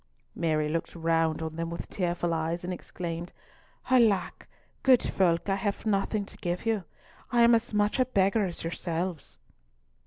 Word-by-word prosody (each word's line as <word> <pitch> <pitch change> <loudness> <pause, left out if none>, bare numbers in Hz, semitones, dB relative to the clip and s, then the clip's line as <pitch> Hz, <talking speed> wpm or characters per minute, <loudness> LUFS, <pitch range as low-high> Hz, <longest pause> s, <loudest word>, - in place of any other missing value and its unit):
Mary 155 -2 0
looked 165 +3 -3
round 165 -1 +1
on 160 0 -5
them 165 0 -2
with 170 0 -6
tearful 175 -2 -1
eyes, 165 +2 -2
and 180 +1 -3
exclaimed, 175 -1 -6 0.6
"Alack, 220 -8 +3 0.3
good 260 -2 +5
folk, 170 -2 +1
I 195 - +2
have 200 +2 -2
nothing 205 0 0
to - - -13
give 175 +3 -3
you! 220 -5 0 0.5
I 240 - +4
am 235 0 +7
as 230 0 +2
much 210 +3 +1
a 255 - +4
beggar 200 -3 +2
as 175 - -5
yourselves!" 165 - -3
180 Hz, 160 wpm, -28 LUFS, 165-205 Hz, 0.6 s, am